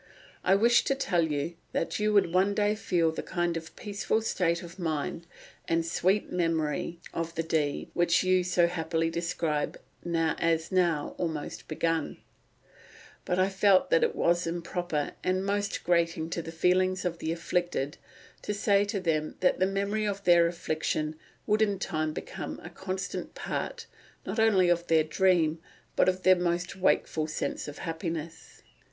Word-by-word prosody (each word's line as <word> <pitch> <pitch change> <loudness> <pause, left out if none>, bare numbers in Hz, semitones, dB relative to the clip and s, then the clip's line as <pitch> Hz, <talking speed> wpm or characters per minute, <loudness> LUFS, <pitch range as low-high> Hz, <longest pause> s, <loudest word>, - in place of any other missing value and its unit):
I 190 - +4
wished 230 +3 +4
to 275 - +2
tell 200 -11 +1
you 150 +4 -2 0.2
that 165 - -1
you 210 0 +2
would 200 -5 +3
one 195 +2 +3
day 210 0 +2
feel 175 -6 +1
the - - -4
kind 175 -2 -1
of 165 0 -7
peaceful 205 +1 -1
state 170 -5 0
of 170 +2 -11
mind 165 0 -3 0.4
and 165 0 +1
sweet 185 +4 +1
memory 165 -1 -1
of 165 0 -3
the 165 - -1
dead 155 -3 -1
which 175 +1 +3
you 185 0 +3
so 175 -1 +3
happily 165 -1 -1
describe 165 -3 -2 0.2
as 165 0 0
now 170 -5 +1
almost 160 -4 -4
begun; 165 0 -1 1.1
but 180 - 0
I 185 +1 +3
felt 195 - +3
that - - +5
it 470 - +1
was 175 0 +2
improper, 170 -2 -2
and 185 +1 0
most 205 0 -1
grating 170 -2 +1
to 170 - -2
the 165 - -7
feelings 185 +2 +2
of 170 -1 -2
the 160 - -2
afflicted, 170 -3 -1 0.4
to 210 - -3
say 200 0 +3
to 200 0 -2
them 155 -4 -1
that 180 - +3
the 185 - +3
memory 200 +2 -1
of 200 -1 -3
their 175 -2 +6
affliction 155 -2 -2 0.3
would 215 +1 +2
in 205 -2 +2
time 155 -4 -2
become - - -6
a - - -9
constant 190 0 -5
part, - - -4 0.4
not 220 - -3
only 205 -5 +4
of 175 0 +1
their 160 -1 +4
dream, 165 -1 +2 0.4
but - - +4
of 185 0 -2
their 185 0 +7
most 175 +1 -1
wakeful 165 -4 +1
sense 155 - -3
of 145 - -7
happiness. 165 -1 -6
175 Hz, 165 wpm, -28 LUFS, 165-190 Hz, 1.1 s, their